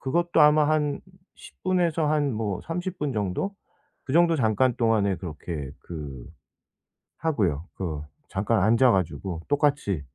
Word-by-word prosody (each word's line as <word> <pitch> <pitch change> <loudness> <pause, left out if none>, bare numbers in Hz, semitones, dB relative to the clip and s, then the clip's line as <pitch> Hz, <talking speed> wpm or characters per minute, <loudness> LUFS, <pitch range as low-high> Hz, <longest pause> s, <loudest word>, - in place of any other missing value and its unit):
그것도 170 +5 +1
아마 150 0 +5
한 150 -2 +1 0.4
10 - - -15
분에서 175 -4 +1
한 145 -2 +1
뭐 105 -4 -2
30 175 +2 -4
분 145 -2 -1
정도? 105 - -2 0.5
그 130 - -5
정도 170 +1 +5
잠깐 120 0 +2
동안에 110 -4 +2
그렇게 80 -5 -6
그 70 -7 -8 0.9
하고요. 95 - 0
그 80 -6 -4 0.3
잠깐 100 +2 +1
앉아 115 +4 +5
가지고 90 -2 -2
똑같이 140 - +1
115 Hz, 235 characters per minute, -26 LUFS, 95-150 Hz, 0.9 s, 아마